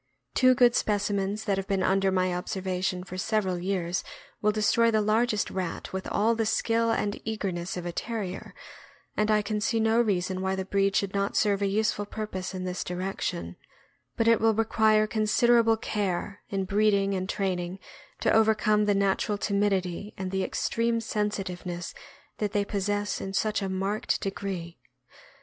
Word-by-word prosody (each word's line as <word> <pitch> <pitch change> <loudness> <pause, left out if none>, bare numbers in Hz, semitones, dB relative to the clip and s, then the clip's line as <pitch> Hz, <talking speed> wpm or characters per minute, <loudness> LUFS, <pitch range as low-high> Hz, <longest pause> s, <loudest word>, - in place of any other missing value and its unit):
Two 255 0 +5
good 245 -1 +5
speci 205 -3 +1
mens 200 +2 -1
that 200 -3 +1
have 195 0 -3
been 195 -2 0
under 195 0 +2
my 185 -1 +1
observation 185 0 -2
for 185 0 -7
several 190 -3 0
years 180 -1 -1 0.4
will 210 - +3
destroy 220 +2 +3
the 220 -1 +2
largest 215 +1 +1
rat 185 -2 -4
with 190 0 -4
all 220 +3 +2
the 225 0 0
skill 230 +1 +1
and 205 -2 -1
eagerness 190 -5 -3
of 175 - -5
a 175 - -2
Terrier, 205 -1 -5 0.6
and 210 0 +1
I 210 -1 +3
can 210 +1 -2
see 225 +1 +1
no 225 +1 +3
reason 185 -4 0
why 190 0 0
the 190 0 -3
breed 195 0 +1
should 195 +1 0
not 200 0 0
serve 205 -2 +2
a 200 - +2
useful 205 0 0
purpose 190 -4 -5
in 185 - -4
this 180 -1 -3
direction; 180 - -4 0.6
but 230 - +2
it 230 0 +5
will 225 -1 +4
require 220 -1 +3
considerable 225 +1 +3
care 200 -2 -2
in 195 -1 -1
breeding 200 0 +2
and 185 0 -2
train 190 -3 0
ing 175 +2 -5 0.4
to - - +3
overcome 215 -1 +3
the 205 -1 +2
natural 200 +1 +1
timidity 200 -1 -1
and 190 0 -4
extreme 230 +4 0
sensitive 210 -5 -2
ness 175 -1 -5 0.5
that 210 -1 -1
they 205 -1 +1
possess 205 0 -1
in 195 - -5
such 215 +1 0
a 195 - -2
marked 195 +3 -1
degree. 190 -5 -5
200 Hz, 170 wpm, -27 LUFS, 190-215 Hz, 0.6 s, Two